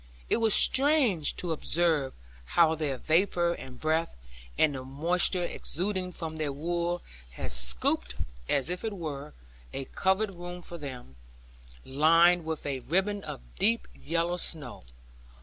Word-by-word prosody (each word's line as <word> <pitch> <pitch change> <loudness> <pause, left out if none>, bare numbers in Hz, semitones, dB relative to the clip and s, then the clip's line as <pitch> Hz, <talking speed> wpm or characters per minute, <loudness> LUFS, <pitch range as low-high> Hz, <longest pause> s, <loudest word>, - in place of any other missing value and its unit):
It - - +5
was 225 -2 +4
strange 265 - +3
to 175 - -2
observe 160 -3 +1 0.4
how 165 -2 +6
their 150 -4 -2
vapour 170 +4 +2
and 130 -6 -10
breath, 160 +1 0 0.4
and 155 -2 +4
the 130 -1 -5
moisture 170 +7 +1
exuding 185 +1 -2
from 160 -2 -5
their 155 -2 -1
wool 170 +4 -2 0.3
had - - -5
scooped, - - +1 0.3
as 140 +4 +1
it 180 - -2
were, 150 -5 -6 0.4
a 135 - -4
coved 195 +6 +1
room 175 0 -8
for 170 0 -7
them, 125 - -8 0.7
lined 165 +5 +4
with 160 -1 -4
a 140 -2 -2
ribbing 195 +9 0
of - - -5 0.2
deep 230 +3 +2
yellow 170 +3 -1
snow. 155 -8 -2
165 Hz, 135 wpm, -29 LUFS, 145-180 Hz, 0.7 s, how